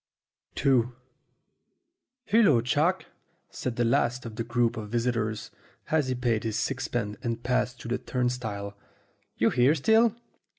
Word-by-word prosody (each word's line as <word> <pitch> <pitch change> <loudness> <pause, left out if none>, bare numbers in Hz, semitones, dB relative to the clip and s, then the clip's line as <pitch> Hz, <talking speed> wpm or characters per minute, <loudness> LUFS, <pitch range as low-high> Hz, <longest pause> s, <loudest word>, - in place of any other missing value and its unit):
ii 135 -3 +6 1.4
"HULLO, 200 - +4
Chalk," 155 +9 +1 0.5
said 125 -2 -4
the 120 - +1
last 120 +2 +1
of 115 -2 -7
the 115 - -2
group 120 0 +1
of 105 -2 -6
visitors, 115 -2 -1 0.4
as 155 -4 +2
he 130 - -1
paid 120 -3 0
his 110 -2 -2
sixpence 120 -5 -2
and 115 0 -3
passed 125 0 0
through 120 - -8
the 125 +1 -1
turn 125 0 -1
stile. 105 -5 -4 0.6
"You 115 - +3
here 130 +5 +4
still?" 220 - +4
120 Hz, 140 wpm, -27 LUFS, 115-130 Hz, 1.4 s, ii